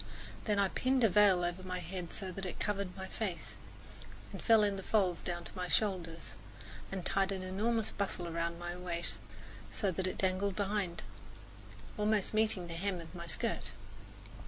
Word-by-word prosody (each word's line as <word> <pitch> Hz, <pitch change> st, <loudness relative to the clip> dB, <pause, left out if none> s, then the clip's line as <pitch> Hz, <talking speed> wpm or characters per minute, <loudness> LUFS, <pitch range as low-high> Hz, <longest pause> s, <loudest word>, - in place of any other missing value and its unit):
Then 210 Hz, -2 st, +2 dB
I 200 Hz, -1 st, +4 dB
pinned 255 Hz, +3 st, +2 dB
a 225 Hz, -, +7 dB
veil 195 Hz, -2 st, +6 dB
over 175 Hz, +1 st, -2 dB
my 185 Hz, 0 st, -3 dB
head 180 Hz, 0 st, -5 dB
so 190 Hz, -3 st, -3 dB
that 195 Hz, +2 st, -6 dB
it -, -, -5 dB
covered 200 Hz, -2 st, -1 dB
my 190 Hz, -, -4 dB
face 190 Hz, -5 st, -3 dB, 0.8 s
and -, -, -6 dB
fell 225 Hz, -2 st, +6 dB
in 205 Hz, -1 st, +2 dB
folds 185 Hz, -4 st, +2 dB
down 175 Hz, -1 st, -3 dB
to -, -, -6 dB
my 180 Hz, -1 st, -2 dB
shoulders, 175 Hz, -6 st, 0 dB, 0.6 s
and 190 Hz, -2 st, -3 dB
tied 195 Hz, 0 st, +3 dB
an 190 Hz, -1 st, -2 dB
enormous 215 Hz, +4 st, +1 dB
bustle 195 Hz, -3 st, -2 dB
round 170 Hz, 0 st, -1 dB
my 175 Hz, 0 st, -4 dB
small 180 Hz, +1 st, -7 dB
waist, 170 Hz, -11 st, -2 dB, 0.5 s
so 195 Hz, -, 0 dB
that 185 Hz, +2 st, -1 dB
it 185 Hz, -, -2 dB
dangled 190 Hz, +1 st, +1 dB
behind, 200 Hz, -4 st, 0 dB, 1.0 s
almost 210 Hz, -1 st, +2 dB
meeting 215 Hz, -4 st, +2 dB
the 170 Hz, -, -6 dB
hem 185 Hz, +2 st, -1 dB
of 165 Hz, 0 st, -9 dB
my 170 Hz, -1 st, -6 dB
skirt. 225 Hz, -, -1 dB
185 Hz, 180 wpm, -34 LUFS, 175-205 Hz, 1.0 s, a